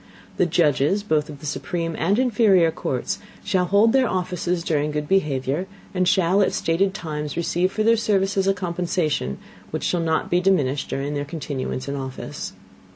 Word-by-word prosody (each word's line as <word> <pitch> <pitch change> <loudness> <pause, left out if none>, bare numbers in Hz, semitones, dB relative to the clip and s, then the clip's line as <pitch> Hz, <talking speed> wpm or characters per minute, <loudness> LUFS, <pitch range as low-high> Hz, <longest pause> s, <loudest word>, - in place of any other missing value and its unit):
The 180 - +3
Judges, 160 +3 +2
both 155 -7 0
of 145 -2 -9
the - - -9
supreme 165 +4 -3
and 195 +6 +1
inferior 210 -9 +4
Courts, 130 -4 -3 0.2
shall 185 -3 +1
hold 205 +5 +4
their 265 -2 +3
Offices 180 -1 -1
during 150 -3 0
good 150 0 -3
behavior, 150 -2 0 0.3
and 185 -1 +1
shall, 185 +2 +3
at 195 - +2
stated 190 +4 +1
Times, 150 -6 -4
receive 175 +2 +1
for 215 - -1
their 230 +1 +5
Services, 195 -3 +1
a 195 - +4
Compensation, 170 - -1 0.3
which - - -4
shall 175 - +1
not 160 -1 0
be 175 +1 +3
diminished 145 -8 +1
during 140 +2 -2
their 145 -1 -2
Continuance 140 -3 -4
in 140 - -2
Office. 130 -1 -6
170 Hz, 170 wpm, -23 LUFS, 150-195 Hz, 0.3 s, their